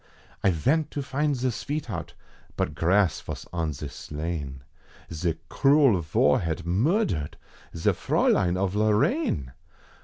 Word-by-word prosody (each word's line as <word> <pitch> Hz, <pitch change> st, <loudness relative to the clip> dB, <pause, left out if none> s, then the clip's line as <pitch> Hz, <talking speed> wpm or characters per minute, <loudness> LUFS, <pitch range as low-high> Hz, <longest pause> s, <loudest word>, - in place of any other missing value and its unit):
I 100 Hz, -, +5 dB
vent 140 Hz, -, +1 dB
to 140 Hz, -, -1 dB
find 145 Hz, +2 st, 0 dB
ze 130 Hz, 0 st, 0 dB
sveetheart, 120 Hz, -, -4 dB, 0.4 s
but -, -, -1 dB
grass 90 Hz, -1 st, +2 dB
vos -, -, -7 dB
on 80 Hz, -3 st, -1 dB
ze 75 Hz, +1 st, -6 dB
slain, 75 Hz, -3 st, -5 dB, 0.5 s
Ze 80 Hz, +1 st, -1 dB
cruel 135 Hz, -, +4 dB
Var 75 Hz, -1 st, +3 dB
had 80 Hz, -2 st, -3 dB
murdered 95 Hz, -, 0 dB, 0.4 s
ze 80 Hz, -, +2 dB
Fraulein 90 Hz, -1 st, +2 dB
of 95 Hz, 0 st, 0 dB
Lorraine! 105 Hz, -, +1 dB
90 Hz, 125 wpm, -26 LUFS, 80-135 Hz, 0.5 s, I